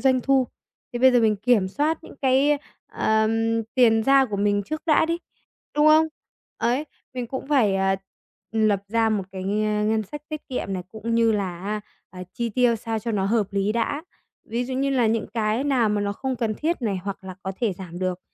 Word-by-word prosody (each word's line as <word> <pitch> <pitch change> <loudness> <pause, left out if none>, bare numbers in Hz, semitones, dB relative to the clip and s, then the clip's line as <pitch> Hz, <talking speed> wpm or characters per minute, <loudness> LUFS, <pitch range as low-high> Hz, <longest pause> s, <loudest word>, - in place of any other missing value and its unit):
doanh 260 -1 +3
thu, 265 0 +2 0.5
thì 240 - -3
bây 260 0 +6
giờ 245 - +5
mình 215 -2 +3
kiểm 210 -3 +2
soát 300 +9 0
những - - -12
cái, 270 +3 +3 0.3
ờm, 225 +1 +1
tiền 225 -3 +5
ra 270 +2 +5
của 210 -5 -4
mình 205 0 +1
trước 310 +9 -5
đã 315 0 +4
đi, 335 +1 -1 0.6
đúng 295 +1 +5
không? 310 +1 +6 0.5
Ấy, 245 +6 0 0.3
mình 250 -1 -3
cũng 265 +2 -5
phải, 225 -10 +3
ờ, 195 0 +2 0.6
ừm, 220 -1 +2
lập 200 -1 +1
ra 225 +1 +2
một 205 -3 0
cái 190 -1 -5
ngân 210 +2 +1
sách 290 +9 -8
tiết 305 -1 -7
kiệm 250 -6 -3
này, 185 - -3
cũng 225 +1 -3
như 230 -1 +4
là 190 -4 -2
á, 210 +1 -2 0.3
à, 180 -1 -8
chi 235 -1 -1
tiêu 240 +1 +2
sao 225 0 -3
cho 230 +2 -4
nó 195 -2 0
hợp 210 0 +2
lý 200 +1 0
đã. 235 +6 -1 0.4
Ví 235 +2 -2
dụ 260 +1 -4
như 275 +1 0
là 250 -4 +3
những 225 0 0
cái 220 +3 0
nào 260 -6 +2
mà 210 0 0
nó 200 0 -1
không 260 +4 -3
cần 220 -2 -1
thiết 320 +1 -2
này 205 -4 0
hoặc 195 -1 -5
là 185 -1 -7
có 190 - -3
thể 225 -5 +1
giảm 175 -1 -8
được 185 -1 -2
225 Hz, 220 wpm, -24 LUFS, 205-260 Hz, 0.6 s, bây